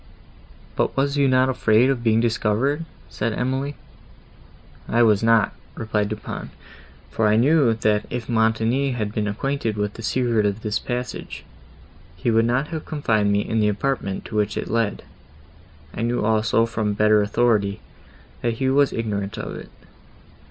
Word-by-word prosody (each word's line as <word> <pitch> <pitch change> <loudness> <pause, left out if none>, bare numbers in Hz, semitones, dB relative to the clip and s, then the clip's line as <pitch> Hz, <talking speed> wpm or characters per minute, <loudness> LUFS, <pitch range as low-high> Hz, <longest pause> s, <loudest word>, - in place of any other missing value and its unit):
"But - - -1
were 135 - +3
you 140 0 +1
not 130 0 +3
afraid 125 0 +3
of 120 -3 -3
being 110 -1 +3
discovered?" 120 +7 0 0.2
said 115 - -3
Emily. 130 +4 -2 1.1
"I 120 +1 +3
was 105 -3 +4
not," 115 -2 +3 0.2
replied 105 -2 -1
Du 110 - -2
Pont; 105 - -7 0.6
"for 110 - +1
I 105 - +3
knew, 130 0 +4
that, 105 -2 0
if 120 -2 -4
Montoni 115 +4 +1
had 105 -4 -3
been 105 -1 -1
acquainted 115 +1 -2
with 105 0 -2
the - - -9
secret 115 -2 +1
of 100 +2 -4
this 105 -1 -1
passage, 125 0 -5 0.7
he 90 +7 -1
would 115 0 +3
not 125 +5 0
have 160 -2 -5
confined 110 -9 0
me 100 0 +2
in 110 +1 -1
the 105 -1 +3
apartment, 105 -2 -2
to - - -7
which 105 -1 0
it - - -4
led. 115 -3 0 0.9
I - - -5
knew 120 -1 0
also, 110 +1 +2
from 110 -2 -2
better 105 0 +4
authority, 105 -1 +1 0.6
that 120 -1 0
he 130 +3 -1
was 140 0 +3
ignorant 105 -1 -3
of 105 - -5
it. - - -9
115 Hz, 165 wpm, -22 LUFS, 105-125 Hz, 1.1 s, was